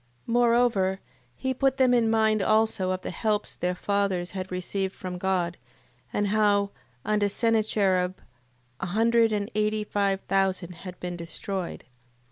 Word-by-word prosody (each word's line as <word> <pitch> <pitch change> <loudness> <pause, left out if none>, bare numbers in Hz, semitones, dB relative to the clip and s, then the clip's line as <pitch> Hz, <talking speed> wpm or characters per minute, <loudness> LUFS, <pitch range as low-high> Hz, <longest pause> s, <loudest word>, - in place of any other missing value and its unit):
8:19. 230 - -2
Moreover, 235 -6 +3 0.4
he 260 - -2
put 270 +1 +1
them 255 -2 +4
in 235 -2 +3
mind 220 -1 +3
also 215 -3 +2
of 185 0 -1
the - - -4
helps 210 +4 -1
their 180 0 -1
fathers 195 -2 -1
had 185 -1 -5
received 190 +1 -2
from 180 -1 -6
God: 180 -2 0 0.5
and 205 -1 0
how, 205 -1 +2 0.3
under 210 -1 +2
Sennacherib, 200 -5 +1 0.6
a - - -3
hundred 225 +3 +3
and 210 +1 -2
eighty 215 0 0
five 200 -2 0
thousand 190 -2 0
had 180 0 -9
been 180 0 -4
destroyed. 175 +2 -5
200 Hz, 145 wpm, -26 LUFS, 185-220 Hz, 0.6 s, them